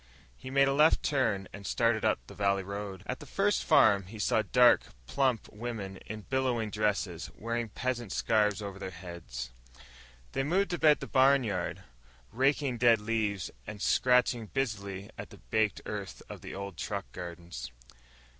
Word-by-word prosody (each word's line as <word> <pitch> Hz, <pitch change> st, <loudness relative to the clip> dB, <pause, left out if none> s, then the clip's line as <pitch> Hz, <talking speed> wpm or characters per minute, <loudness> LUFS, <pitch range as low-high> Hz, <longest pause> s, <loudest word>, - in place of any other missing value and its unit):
He 130 Hz, -, -9 dB
made 140 Hz, +1 st, +4 dB
a 135 Hz, -, +2 dB
left 150 Hz, +3 st, +4 dB
turn 110 Hz, -10 st, +1 dB
and 100 Hz, -, -9 dB
started 115 Hz, +2 st, +1 dB
up 110 Hz, -, +3 dB
the -, -, -12 dB
valley 100 Hz, 0 st, +1 dB
road. 100 Hz, -1 st, -6 dB
At 125 Hz, -, -4 dB
the -, -, -11 dB
first 200 Hz, +1 st, +1 dB
farm 100 Hz, -3 st, +5 dB
he 110 Hz, +3 st, -9 dB
saw 110 Hz, +1 st, +2 dB
dark, 120 Hz, +3 st, +5 dB, 0.2 s
plump 130 Hz, -, 0 dB
women 105 Hz, -4 st, -5 dB
in 110 Hz, 0 st, -6 dB
billowing 125 Hz, -3 st, -1 dB
dresses, 100 Hz, -5 st, -1 dB
wearing 115 Hz, 0 st, -2 dB
peasant 120 Hz, -1 st, -3 dB
scarves 105 Hz, -2 st, +1 dB
over 100 Hz, -1 st, -6 dB
their 95 Hz, -, -5 dB
heads. 85 Hz, -10 st, -7 dB, 0.8 s
They 135 Hz, -, -1 dB
moved 180 Hz, +7 st, +1 dB
about 155 Hz, -3 st, +4 dB
the -, -, -5 dB
barnyard, 130 Hz, -9 st, +2 dB, 0.5 s
raking 135 Hz, -1 st, +1 dB
dead 120 Hz, -2 st, +5 dB
leaves 105 Hz, -4 st, -1 dB, 0.2 s
and 105 Hz, -, -7 dB
scratching 125 Hz, 0 st, +3 dB
busily 100 Hz, -6 st, -3 dB
at -, -, -6 dB
the -, -, -13 dB
baked 110 Hz, -1 st, 0 dB
earth 100 Hz, -4 st, -6 dB
of -, -, -8 dB
the -, -, -8 dB
old 100 Hz, 0 st, -6 dB
truck 100 Hz, -2 st, -3 dB
gardens. 85 Hz, -1 st, -7 dB
110 Hz, 160 wpm, -30 LUFS, 100-125 Hz, 0.8 s, farm